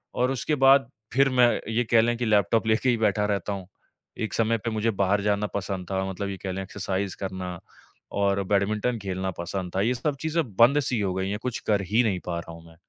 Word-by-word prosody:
और 125 +1 +1
उसके 135 +4 -1
बाद 135 -1 +6 0.2
फिर 135 +2 +4
मैं 125 -2 +5 0.2
ये 115 +2 +1
कह 115 -1 +7
लें 120 +1 +1
कि 120 - -2
लैपटॉप 110 +1 +2
लेके 110 +4 +2
ही 120 - +2
बैठा 105 -2 +1
रहता 105 0 -1
हूँ। 95 -2 -7 0.5
एक 110 - -3
समय 115 0 +2
पे 115 +2 -3
मुझे 110 +1 0
बाहर 100 0 +1
जाना 105 0 +1
पसंद 95 -2 -3
था, 95 0 0
मतलब 100 +1 -4
ये 100 - -5
कह 95 - -2
लें 95 +1 -4
एक्सरसाइज़ 95 0 -3
करना 95 -2 -5 0.5
और 100 -1 +1
बैडमिंटन 105 +4 0
खेलना 95 -1 -3
पसंद 90 +1 -4
था, 95 - +2
ये 115 +5 +2
सब 140 +4 -2
चीज़ें 160 +1 0
बंद 125 +5 +6
सी 125 -4 -1
हो 95 -2 0
गई 95 +1 -1
है, 105 - -1
कुछ 125 +2 -3
कर 105 -2 +3
ही 115 +3 +4
नहीं 100 -5 0
पा 85 -1 -2
रहा 85 - -9
हूँ 85 0 -13
मैं। 80 - -17
105 Hz, 235 wpm, -26 LUFS, 95-120 Hz, 0.5 s, कह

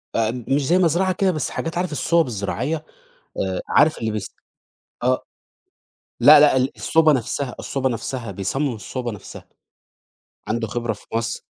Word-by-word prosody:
آآ 110 -1 +2 0.2
مش 140 +1 +1
زي 175 - +4
مزرعة 185 +1 +2
كده، 190 +1 +1
بس 155 -4 -2
حاجات، 165 +1 -4
عارف 180 -1 -1
الصوَب 165 +2 +2
الزراعية؟ 125 +8 -3 0.5
آآ - - -2
عارف 155 +2 +4
اللي 110 -1 -2
بيس 105 -3 -5 0.7
آه 125 +1 +1 1.0
لأ، 150 0 +9
لأ 145 -3 +5
ال 130 +1 +2
الصوبة 160 -1 +3
نَفْسها، 130 0 -2
الصوبة 135 -1 -1
نَفْسها، 115 -1 -4
بيصمم 120 +8 -2
الصوبة 120 +3 -5
نَفْسها، 105 - -11 1.0
عنده 115 0 -1
خبرة 120 0 -2
في 105 - -16
مصر، 115 0 -2
130 Hz, 150 wpm, -22 LUFS, 115-155 Hz, 1.0 s, لأ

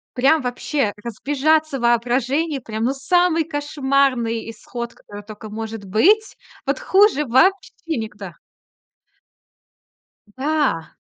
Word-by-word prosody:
прям 275 +5 +3
вообще 250 -1 -1
разбежаться 285 +5 0
в - - -8
воображении, 255 +6 +1
прям, 220 -2 -5
ну, 250 - +2
самый 325 +4 +2
кошмарный 275 -6 0
исход, 235 +2 -7
который 205 0 -12
тока 215 0 -10
может 220 -1 -6
быть. 390 - +3 0.3
Вот - - 0
хуже 395 - +3
вообще 330 +11 +3 0.3
никуда. 210 -5 -7 2.0
Да. 275 - -1
265 Hz, 105 wpm, -21 LUFS, 225-310 Hz, 2.0 s, прям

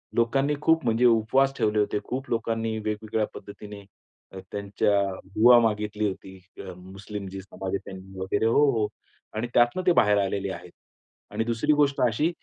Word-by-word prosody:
लोकांनी 135 +5 +1
खूप 160 +1 +3
म्हणजे 115 +1 +2
उपवास 120 +4 +3
ठेवले 105 0 +1
होते. 105 0 0
खूप 130 +2 -5
लोकांनी 115 -1 -1
वेगवेगळ्या 110 0 -2
पद्धतीने 100 0 -10 0.5
अ, 95 - -9
त्यांच्या 100 0 0 0.2
दूवा 110 +6 +6
मागितली 105 -1 0
होती. 95 0 -9 0.2
अ, 95 -2 -7
मुस्लिम 95 +2 -8
जी 95 0 -7
समाज 95 0 -7
आहे - - +2
त्यांनी 95 0 -10
वगैरे 95 +3 -1
हो, 115 +6 +4
हो. 110 -4 0 0.5
आणि 110 +3 -2
त्यातनं 120 +10 +3
ते - - +7
बाहेर 105 -8 +4
आलेले 100 0 -1
आहेत. 90 0 -10 0.6
आणि 105 +2 -1
दुसरी 115 +6 +1
गोष्ट 140 -1 +2
अशी, 135 +8 0
105 Hz, 165 wpm, -26 LUFS, 100-120 Hz, 0.6 s, ते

